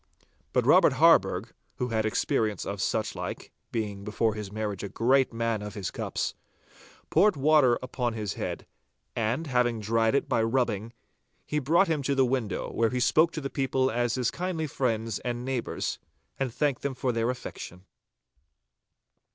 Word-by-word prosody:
But - - +1
Robert - - +6
Harburgh, - - +4 0.2
who 125 - -2
had 110 -1 0
experience 110 -1 0
of 100 0 -4
suchlike, 110 -1 -3 0.2
being 105 -3 -3
before 110 +1 0
his 105 -2 -6
marriage 105 -2 -3
a 100 - -5
great 130 +6 +2
man 115 -2 -1
of 105 -1 -7
his 100 -3 -4
cups, - - -3 0.8
poured 210 -2 +4
water 140 -4 +4
upon 125 -2 -2
his 105 -5 -3
head, - - -5 0.5
and, 120 +8 -1
having 125 -4 +1
dried 115 +3 +1
it 140 - +1
by 115 - +1
rubbing, 115 -2 0 0.5
he 150 - -1
brought 165 +8 +3
him 160 -3 0
to 140 +1 0
the 135 -1 +4
window, 120 -7 -2
where 115 -1 +2
he 125 - -2
spoke 160 +7 +4
to 155 - -4
the 135 - -4
people 130 -1 +1
as 120 0 0
his 125 -2 0
kindly 175 -3 -2
friends 115 -6 -1
and 120 0 -4
neighbours, 130 -3 -2 0.4
and 135 -2 -1
thanked 140 +1 0
them 140 -2 -2
for 125 0 0
their 115 0 0
affection. 95 -7 -7
120 Hz, 165 wpm, -28 LUFS, 110-135 Hz, 0.8 s, Robert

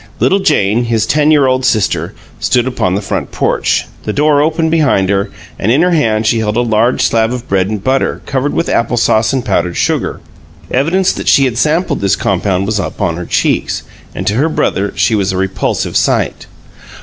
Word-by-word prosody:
Little 195 - +2
Jane, 120 - +1
his 115 -2 0
ten 150 +5 +2
year 150 -3 +4
old 130 0 +1
sister, 110 -6 0 0.2
stood 125 -1 +1
upon 110 -8 -1
the 100 - -3
front - - -3
porch, - - 0 0.2
the 105 - -3
door 145 +4 +2
open 160 +1 0
behind 140 - +2
her, 100 0 0 0.3
and 110 - +1
in 145 +7 +3
her 180 - +2
hand 110 -9 +1
she 115 +1 +2
held 105 0 -1
a - - +3
large 115 +1 +1
slab 115 0 +1
of 125 -1 -5
bread 95 -1 +1
and 105 -2 -4
butter 130 +1 0
covered 135 +1 -1
with 165 - -1
apple 120 +1 0
sauce 110 -1 +2
and 130 -3 -2
powdered 90 -3 -1
sugar. - - -1 0.5
Evidence 170 +9 +1
that - - -6
she 135 - +5
had 120 -2 -1
sampled 160 +6 0
this 100 0 +2
compound 95 0 -1
was 105 0 -1
upon 95 -3 -2
her 90 - -6
cheeks, - - 0 0.3
and - - -4
to 105 - +1
her 140 +8 +1
brother 100 -9 -1
she - - +1
was 100 -2 +1
a 95 - -3
repulsive 95 0 -2
sight. - - 0
115 Hz, 200 wpm, -13 LUFS, 100-145 Hz, 0.5 s, she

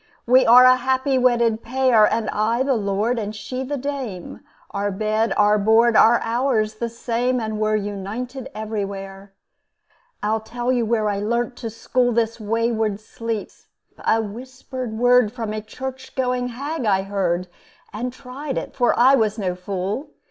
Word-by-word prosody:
We 255 +1 +5
are 250 +2 +9
a 255 0 +7
happy 260 +1 +1
wedded 235 -3 +2
pair, 245 -2 +3
And 225 -1 -1
I 230 +4 +1
the 275 0 +1
lord 215 +2 0
and 210 0 -4
she 255 +5 -5
the 285 +2 -3
dame; 260 -9 -5 0.3
Our 200 0 -1
bed 215 +3 0
our 210 0 +4
board 225 +3 +4
our 230 +2 +6
hours 230 -2 0
the 235 - -2
same, 240 +2 -1
And 220 -2 -3
we're 215 0 +1
united 215 +6 -5
everywhere. 200 -2 -6 0.9
I'll 215 +1 +1
tell 240 +3 -3
you 240 -3 +1
where 220 -2 +1
I 200 -1 -1
learnt 235 +4 -1
to 230 - -5
school 245 +2 0
This 230 0 0
wayward 220 -1 0
sleep: 225 0 -5 0.5
a 225 - +2
whispered 250 +2 -6
word 245 -2 +4
From 225 -3 -4
a 215 - -3
church 260 +4 -8
going 250 -1 0
hag 280 +5 -4
I 195 -2 +2
heard, 185 -3 -1 0.5
And 240 +4 -3
tried 265 +2 -6
it - - -4
for 245 -2 +2
I 255 +3 +6
was 220 -4 +2
no 190 -4 -1
fool. 195 - -4
230 Hz, 165 wpm, -22 LUFS, 210-250 Hz, 0.9 s, are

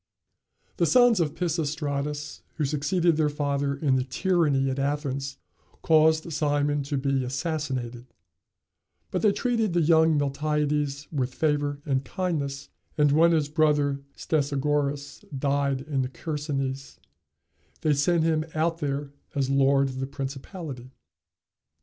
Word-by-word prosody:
] - - -43
The - - +2
sons 245 -4 +5
of 155 -3 0
Pisistratus, 150 -3 -2
who 155 - 0
succeeded 160 +4 +1
their 155 -2 +2
father 140 -1 -1
in 140 -2 +1
the 130 - 0
tyranny 145 -1 +1
at 130 - -3
Athens, 140 -1 -2 0.5
caused 160 0 +4
Cimon 145 -1 +1
to 140 0 -2
be 135 -1 0
assassinated; 130 -3 -3 1.0
but - - -1
they 210 - +4
treated 225 -3 0
the 175 - +3
young 160 0 +4
Miltiades 145 0 -1
with 130 -4 -2
favor 145 -2 0
and 135 -2 0
kindness 140 -4 -3 0.3
and 150 -1 +4
when 165 +3 +5
his 155 -3 +2
brother 145 -2 +2
Stesagoras 145 -1 -1
died 140 -1 0
in 140 -1 -2
the 130 - -2
Chersonese, 135 -3 -4 0.8
they 155 - +3
sent 160 +4 +2
him 160 -1 +2
out 165 +1 0
there 140 -1 -3 0.2
as 135 -1 0
lord 135 0 +4
of 130 0 -6
the 135 - -2
principality. 135 0 -6
145 Hz, 130 wpm, -26 LUFS, 140-155 Hz, 1.0 s, sons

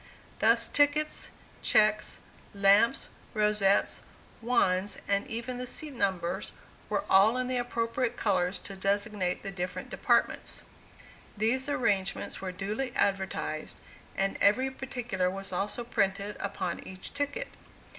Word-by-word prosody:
Thus, - - +4
tickets, 290 +1 +1 0.3
checks, 215 0 +3 0.3
lamps, 200 +3 +4 0.3
rosettes, 210 -2 +3 0.4
wands, 205 -5 +1
and 200 0 +1
even 235 +2 -4
the 250 - -4
seat 300 +3 -4
numbers 190 -7 -1 0.4
were 295 - 0
all 210 +5 +5
in 255 - 0
the 255 0 -1
appropriate 235 0 -1
colors 185 -3 +1
to 195 - -6
designate 200 -1 0
the 195 - -4
different 180 -1 -5
departments. - - +1 0.7
These 255 +6 +1
arrangements 205 -8 0
were 190 -1 -3
duly 210 +7 -3
advertised, 190 -5 -1 0.4
and 195 0 0
every 255 +6 +4
particular 245 -8 -2
was 195 +1 -5
also 200 +6 -2
printed 200 -3 0
upon 185 -3 -3
each 185 0 -9
ticket. 290 - -2
210 Hz, 120 wpm, -29 LUFS, 195-245 Hz, 0.7 s, all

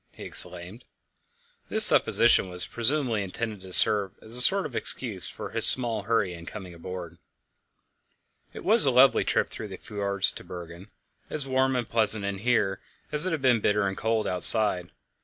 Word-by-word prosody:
he - - -14
exclaimed. 90 +7 -6 0.8
This - - +8
supposition 115 -5 +2
was 90 0 -1
presumably 120 -2 -3
intended 105 +2 -8
to 95 0 -15
serve 100 0 +3
as 110 +2 -6
a 125 - +3
sort 195 +8 +2
of - - -10
excuse 105 -8 -3
for - - -11
his - - +4
small 120 -4 0
hurry 105 -3 -4
in 85 0 -14
coming 95 -4 -12
on 85 - -18
board. 90 -2 -11 1.3
It - - -13
was 210 -7 +4
a - - +2
lovely 130 +2 +1
trip - - -3
through 110 - -10
the 95 -2 -12
fjords 100 -2 -3
to - - -14
Bergen, 85 +1 -13 0.4
as 150 -3 -6
warm 130 0 -2
and 120 -3 -5
pleasant 110 -2 +4
in 100 -1 -7
here 105 -4 -3 0.3
as 150 +4 +2
it - - -4
had 155 -4 -6
been 125 -3 0
bitter 105 0 -2
and 95 - -6
cold 110 +1 -4
outside. 90 -1 +5
105 Hz, 180 wpm, -23 LUFS, 95-125 Hz, 1.3 s, This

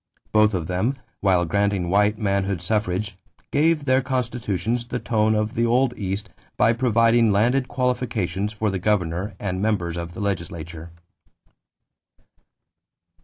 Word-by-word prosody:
Both 105 -1 +4
of 85 -3 -2
them, 95 - -1 0.2
while 90 -3 +3
granting 100 0 0
white 105 +3 +2
manhood 100 -3 0
suffrage, 100 0 -1 0.3
gave 155 0 +2
their 130 0 +3
constitutions 120 -3 -2
the 125 - -3
tone 110 -2 +1
of 105 +1 -1
the 115 +1 +1
old 125 +1 +2
East 100 +1 -3 0.3
by 115 - +4
providing 115 -1 +3
landed 125 +6 +2
qualifications 120 -7 -1
for 110 -1 -1
the 95 - -2
governor 95 0 -1
and 95 -2 -3
members 90 -6 0
of 85 0 -6
the - - -7
legislature. 85 -4 -4
105 Hz, 130 wpm, -23 LUFS, 95-120 Hz, 0.3 s, Both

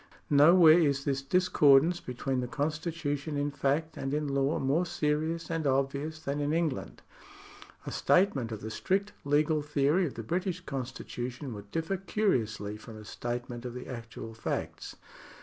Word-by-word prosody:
Nowhere 160 +3 +7
is 140 -4 +1
this 140 -1 0
discordance 160 0 +4
between 130 +1 -3
the 125 - -2
constitution 150 +1 -2
in 145 +1 0
fact 145 +3 -1
and 135 +2 -2
in 150 0 -1
law 140 +1 +1
more 140 +6 +1
serious 165 -1 -1
and 165 -3 -1
obvious 140 +3 0
than 140 -1 -3
in 145 +1 0
England. 160 -5 -2 0.8
A - - -5
statement 140 - +2
of 110 - -5
the 110 - -5
strict 195 - 0
legal 150 +2 +2
theory 150 +4 +2
of 140 - -8
the 115 - -5
British 180 - -2
con 135 -7 -4
stitution 125 +1 -6
would 100 -1 -10
differ 165 - -2
curiously 115 - -1
from 110 0 -11
a 105 - -11
statement 120 +1 -5
of 125 -1 -6
the 125 - -6
actual 115 -2 -7
facts. 110 - -4
145 Hz, 160 wpm, -30 LUFS, 125-160 Hz, 0.8 s, Nowhere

